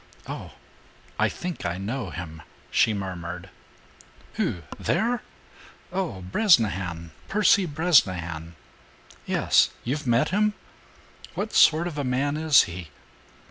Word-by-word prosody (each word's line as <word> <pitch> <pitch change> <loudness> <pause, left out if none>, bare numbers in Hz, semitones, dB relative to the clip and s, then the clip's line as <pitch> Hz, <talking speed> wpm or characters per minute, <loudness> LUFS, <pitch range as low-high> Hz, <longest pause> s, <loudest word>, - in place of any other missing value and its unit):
"Oh! - - -7 0.7
I - - +3
think 180 -1 -6
I 85 -1 -2
know 110 +2 -4
him," 80 -1 -7 0.3
she - - +4
murmured. 90 -2 -5 0.8
"Who? 85 - -2 0.2
There? 235 +7 0 0.7
Oh, 180 - -2
Bresnahan, 95 - +2 0.2
Percy 200 -2 +3
Bresnahan." 95 - +1 0.7
"Yes. - - +3
You've 135 +3 -3
met 120 0 +3
him? 210 +2 +1 0.8
What 215 +2 -3
sort 160 +2 +5
of 160 -4 -4
a - - -1
man 135 +3 0
is 155 -2 +5
he?" 85 -1 -7
120 Hz, 110 wpm, -25 LUFS, -, 0.8 s, sort